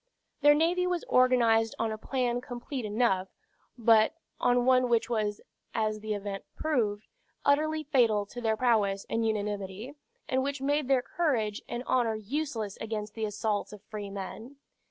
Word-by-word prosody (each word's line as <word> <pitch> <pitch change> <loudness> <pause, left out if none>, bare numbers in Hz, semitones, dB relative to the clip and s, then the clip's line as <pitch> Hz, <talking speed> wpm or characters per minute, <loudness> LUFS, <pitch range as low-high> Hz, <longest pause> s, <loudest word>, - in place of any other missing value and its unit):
Their 295 +1 +7
navy 350 +4 +2
was 355 -2 -1
organized 235 -3 +4
on 225 -1 -1
a - - -2
plan 245 -1 -1
complete 245 0 -5
enough; 210 -3 +1 0.5
but 225 +3 +4 0.2
on 245 0 +3
one 255 -1 +4
which 235 0 +1
was, 210 -2 -1 0.3
as 215 -1 0
the 215 0 -3
event 200 -1 -5
proved, 220 -9 0 0.4
utterly 310 +2 +2
fatal 230 -8 +3
to 245 +4 -8
their 220 -1 +1
prowess 210 -5 +2
and 230 - +1
unanimity, 210 +2 -3 0.3
and 260 -3 +1
which 280 +1 -2
made 285 +2 +1
even - - -10
their 260 -2 +3
courage 235 -11 0
and 240 +1 -3
honor 235 -3 +2
useless 220 -2 -3
against 215 -1 -4
the 220 -1 -2
assaults 210 0 -2
of 210 -1 -12
free 210 -1 -6
men. 205 +6 -7
230 Hz, 160 wpm, -29 LUFS, 210-260 Hz, 0.5 s, Their